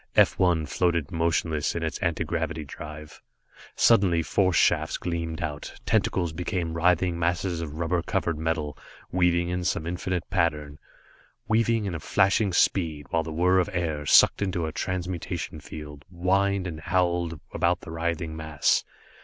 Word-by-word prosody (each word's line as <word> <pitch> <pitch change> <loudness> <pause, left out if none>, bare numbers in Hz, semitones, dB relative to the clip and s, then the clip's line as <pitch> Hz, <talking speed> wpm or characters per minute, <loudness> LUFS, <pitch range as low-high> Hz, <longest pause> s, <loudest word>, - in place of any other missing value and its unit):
F - - +4
1 85 -4 +3
floated 85 +1 0
motionless 80 -2 0
on 85 - -2
its 80 - -3
anti 85 -4 0
gravity 80 -1 -3
drive. 75 +2 -10 0.5
Suddenly, 95 -8 +4
force 95 +1 +1
shafts - - +2
gleamed 85 -1 -3
out, 75 -2 -5
tentacles 85 -4 +1
became 85 -1 -2
writhing 85 +1 +2
masses 85 0 0
of 75 -2 -6
rubber 85 +2 0
covered 85 -1 -1
metal, 80 -2 -2 0.4
weaving 85 -1 +2
in 90 0 -2
some 85 -2 -1
infinite 90 +1 -3
pattern, 75 -5 0 0.7
weaving 115 0 +2
in 85 -4 -3
flashing 100 +4 +2
speed, 80 -5 +1
while 85 - +2
the 80 0 -6
whirr 90 +4 +3
of 90 - 0
air 80 -4 -1
sucked - - +6
into 90 -4 -1
a 80 - -3
transmutation 90 -2 -4
field, 75 -1 -9
whined 95 +2 +1
and 80 -3 -5
howled 85 -2 0
about 90 0 +1
the - - -9
writhing 80 -1 -2
mass. 80 -2 +1
85 Hz, 150 wpm, -26 LUFS, 80-90 Hz, 0.7 s, sucked